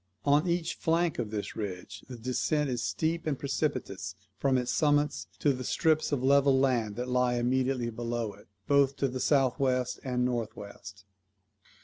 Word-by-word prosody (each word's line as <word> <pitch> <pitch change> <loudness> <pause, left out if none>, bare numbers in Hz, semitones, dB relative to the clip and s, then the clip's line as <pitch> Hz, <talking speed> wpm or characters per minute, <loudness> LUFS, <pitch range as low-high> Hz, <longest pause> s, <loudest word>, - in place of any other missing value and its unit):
On 145 +4 +4
each 170 -1 0
flank 165 -2 0
of 115 -3 -2
this 105 -1 -4
ridge 95 -2 -6
the 125 - -7
descent 130 +4 0
is 120 -2 -2
steep 165 0 -1
and 145 -3 0
precipitous 125 - -2 0.2
from 135 -2 +2
its 125 0 -1
summits 145 - +1
to 145 - +2
the 130 0 -5
strips 155 +4 +1
of 135 -3 0
level 140 0 +5
land 120 -6 +1
that 125 +1 -3
lie 125 -1 +2
immediately 125 0 0
below 115 -2 -3
it, - - -18 0.2
both 140 -1 +3
to 140 - 0
the 130 0 -4
south 135 -1 +2
west 125 -2 0
and 125 -2 0
north 120 -3 -2
west. 100 -1 -10
130 Hz, 170 wpm, -29 LUFS, 120-140 Hz, 0.2 s, level